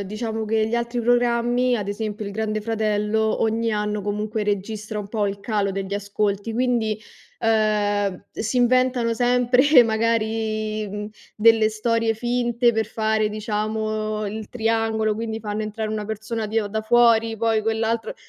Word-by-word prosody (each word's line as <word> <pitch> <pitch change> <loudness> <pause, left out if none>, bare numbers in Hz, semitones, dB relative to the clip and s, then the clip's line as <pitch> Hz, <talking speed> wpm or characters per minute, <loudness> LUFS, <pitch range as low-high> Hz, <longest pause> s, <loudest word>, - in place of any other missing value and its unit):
diciamo 220 +2 -4
che 220 0 +1
gli 225 - -2
altri 235 +1 -1
programmi, 245 +1 +2
ad 205 -3 -4
esempio 210 +1 -4
il 200 - -5
Grande 215 0 -2
Fratello, 220 0 0
ogni 225 +1 +1
anno 210 0 -1
comunque 210 +2 -2
registra 210 +1 -3
un 200 -1 -6
po' 210 -2 0
il 200 0 -4
calo 205 -2 -1
degli 195 0 -4
ascolti, 200 +1 -2
quindi, 235 -3 0 0.4
ehm, 205 -3 +1
si 225 +3 -3
inventano 250 -1 +3
sempre 250 +3 +5
magari, 220 -1 -1
mhmm, 210 +1 -5 0.3
delle 220 0 +5
storie 225 +1 0
finte 240 +1 +1
per 220 -1 0
fare, 220 -1 0
diciamo, 215 0 -2
il 215 +1 -6
triangolo, 225 -2 0
quindi 225 0 -4
fanno 210 0 -3
entrare 215 0 -4
una 215 -1 -3
persona 220 +1 -4
di 220 +2 0
o 205 - -4
da 220 +2 -2
fuori, 230 -1 +4
poi 225 0 +1
quell'altro 225 +1 -1
220 Hz, 150 wpm, -23 LUFS, 210-230 Hz, 0.4 s, sempre